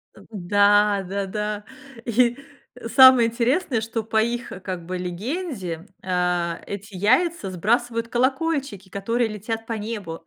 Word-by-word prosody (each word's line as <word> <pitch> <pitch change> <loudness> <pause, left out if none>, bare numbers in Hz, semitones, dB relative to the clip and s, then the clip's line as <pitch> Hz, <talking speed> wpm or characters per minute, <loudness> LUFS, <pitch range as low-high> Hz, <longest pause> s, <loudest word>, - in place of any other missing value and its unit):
Э, - - -15
да 205 +1 +3
да 200 +1 -2
да. 210 +1 -3 0.4
И 240 +1 +2 0.6
самое 260 -3 +8
интересное, 240 +2 0
что 225 0 -3
по 220 0 +1
их, 235 +2 -2
как 180 -3 -5
бы, 185 +1 -4
легенде, 185 - -4 0.2
а, 180 -2 0
эти 200 0 -7
яйца 250 - +1
сбрасывают 230 +5 0
колокольчики, 265 - -1
которые 230 +5 -1
летят 220 +2 -5
по 230 - -2
небу. 210 -6 -5
215 Hz, 130 wpm, -23 LUFS, 190-240 Hz, 0.6 s, самое